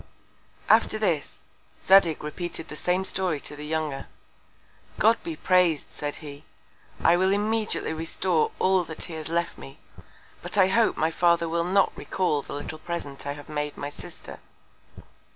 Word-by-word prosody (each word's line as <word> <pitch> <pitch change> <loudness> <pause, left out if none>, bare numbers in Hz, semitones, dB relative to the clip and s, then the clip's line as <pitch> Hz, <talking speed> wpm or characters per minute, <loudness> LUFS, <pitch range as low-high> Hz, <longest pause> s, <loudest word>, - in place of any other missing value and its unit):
After - - +4
this, 175 -9 -1 0.4
Zadig 190 -6 +5
repeated 165 +2 -5
the 150 - -7
same 180 +4 0
Story 185 -6 0
to 150 - -6
the 150 0 -8
Younger. 155 -3 -2 0.9
God 225 +3 +4
be 330 -1 -4
praised, 180 - +2
said 145 0 -4
he! 145 0 -9 0.6
I 170 - +6
will 190 +2 +2
immediately 210 -3 0
restore 165 +1 0
all 190 -1 +3
that 160 0 -6
he 170 - -6
has 160 0 -5
left 170 +1 -1
me; 70 0 -11 0.6
but - - -6
I 190 -1 +6
hope 225 +3 +3
my 160 +1 +1
Father 170 0 +3
will 170 +1 0
not 190 +2 +2
recal 180 -6 -1
the - - -9
little 150 +2 -6
Present 145 -5 -5
I 140 - -1
have 145 0 -11
made 150 -1 -3
my 145 - -4
Sister. 145 - -10
170 Hz, 160 wpm, -26 LUFS, 150-190 Hz, 0.9 s, I